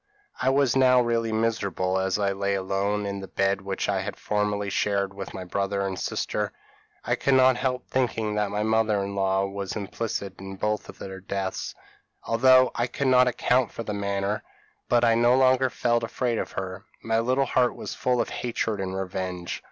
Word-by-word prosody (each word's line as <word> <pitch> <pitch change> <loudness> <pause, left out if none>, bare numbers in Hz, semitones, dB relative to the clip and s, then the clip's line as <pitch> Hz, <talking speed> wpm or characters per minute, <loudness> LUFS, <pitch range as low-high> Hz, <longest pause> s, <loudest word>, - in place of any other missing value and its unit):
p> - - 0
"I - - +7
was 135 -2 +3
now 130 -1 +5
really 115 -2 +1
miserable, 105 -4 0
as 95 0 0
I 100 -1 +1
lay 100 0 -1
alone 100 +2 -1
in 100 0 -3
the 95 - -7
bed 95 +1 0
which 95 0 -3
I 100 -2 0
had 100 +1 -5
formerly 105 -1 -1
shared 100 -1 0
with 100 0 -7
my 95 - -5
brother 100 +2 -1
and 95 -1 -3
sister. - - -2 0.5
I - - +1
could 135 - +2
not 130 0 +6
help 125 0 -1
thinking 115 -4 0
that 105 -1 0
my 105 +1 -1
mother 110 -2 +2
in 100 0 -4
law 95 0 +1
was 100 0 -5
implicated 100 -2 -4
in 95 0 -7
both 105 +2 -1
their 95 0 -8
deaths, 95 0 -4 0.5
although 130 +2 +5
I 120 +1 0
could 130 +2 -1
not 125 0 +6
account 125 0 +2
for 115 - -6
the 105 - -4
manner; 100 0 -1 0.5
but 120 -1 +4
I 115 -1 +5
no 120 +2 +4
longer 130 0 +4
felt 120 0 +1
afraid 115 0 -1
of - - -4
her; 95 0 -5 0.2
my 115 0 +1
little 130 +4 +2
heart 125 -1 +2
was - - -6
full 125 -1 0
of - - 0
hatred 115 -3 -2
and 95 0 -3
revenge. 90 -2 -4
105 Hz, 195 wpm, -26 LUFS, 95-120 Hz, 0.5 s, I